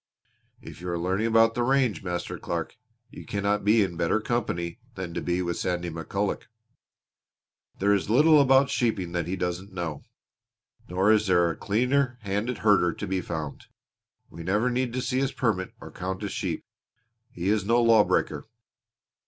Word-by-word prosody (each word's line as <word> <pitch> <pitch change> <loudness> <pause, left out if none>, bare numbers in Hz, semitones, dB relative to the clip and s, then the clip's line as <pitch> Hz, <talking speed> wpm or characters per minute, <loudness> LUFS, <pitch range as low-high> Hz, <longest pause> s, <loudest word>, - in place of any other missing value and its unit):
If - - -11
you 90 - -5
are 85 - -1
learning 95 +6 0
about 115 0 +4
the 120 - -1
range, 125 -7 +2
Master 90 -2 -4
Clark, - - -4 0.4
you - - -10
cannot 100 0 -1
be 105 +1 +4
in 90 -3 -4
better 85 +5 +1
company 105 -5 -2 0.2
than 95 -3 -5
to - - -3
be 90 +1 -1
with 85 -1 -2
Sandy 90 -1 -2
McCulloch. 95 +5 -3 1.3
There 100 +1 +3
is 100 0 0
little 150 +6 +6
about 135 0 +4
sheeping 105 -8 0
that 85 -2 -2
he 90 - -2
doesn't 90 +1 -4
know; 80 -5 -4 0.9
nor 95 +4 +3
is 110 -1 +3
there 85 -2 +3
a - - -6
cleaner 125 +4 +1
handed 105 +4 -2
herder 95 -5 +4
to - - -5
be 95 -1 -1
found. 80 -4 -6 0.6
We 85 - -10
never 105 +8 +1
need 125 0 0
to 130 0 -2
see 130 +1 0
his 135 -1 0
permit 105 -7 -1
or - - -10
count 95 +1 -5
his - - -3
sheep. - - -3 0.6
He 90 +3 -3
is 105 -2 +2
no 115 +4 +3
lawbreaker!" 115 -3 +3
100 Hz, 170 wpm, -26 LUFS, 90-115 Hz, 1.3 s, little